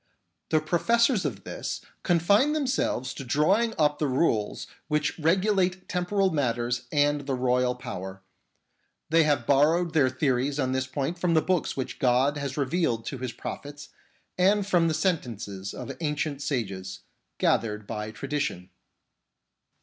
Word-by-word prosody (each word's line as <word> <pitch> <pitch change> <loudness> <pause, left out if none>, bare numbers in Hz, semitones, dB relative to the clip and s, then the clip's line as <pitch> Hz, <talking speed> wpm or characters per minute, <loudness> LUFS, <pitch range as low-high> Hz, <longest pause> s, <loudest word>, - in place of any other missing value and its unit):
The 155 - +3
professors 220 - +2
of 105 -9 -3
this - - -4 0.2
confine 200 - +3
themselves 260 - -1
to - - -7
drawing 190 - +2
up 150 -2 +2
the 150 - +1
rules 125 -6 0 0.2
which 150 +1 -1
regulate 185 +2 +1
temporal 185 +2 +1
matters 120 -4 -1
and 145 -1 +1
the 135 - 0
royal 125 0 +1
power. 95 -6 -7 0.9
They 165 -1 +5
have 145 -6 +1
borrowed 155 +5 +3
their 145 -5 +4
theories 130 +1 0
on 130 -2 0
this 130 0 -1
point 140 +6 -3
from 170 -2 +1
the - - +6
books 185 -6 0
which 130 - -4
God 130 +3 +3
has 140 -1 -4
revealed 140 -5 0
to 135 - -5
His 130 -1 -3
prophets 145 +4 -8 0.5
and 200 +2 +4
from 175 -4 +3
the 160 - 0
sentences 115 - -2
of 125 -2 -7
ancient 150 -2 -2
sages, 95 -9 -3 0.4
gathered 105 -2 +1
by 105 0 -4
tradition. 135 -7 -3
145 Hz, 140 wpm, -27 LUFS, 125-170 Hz, 0.9 s, the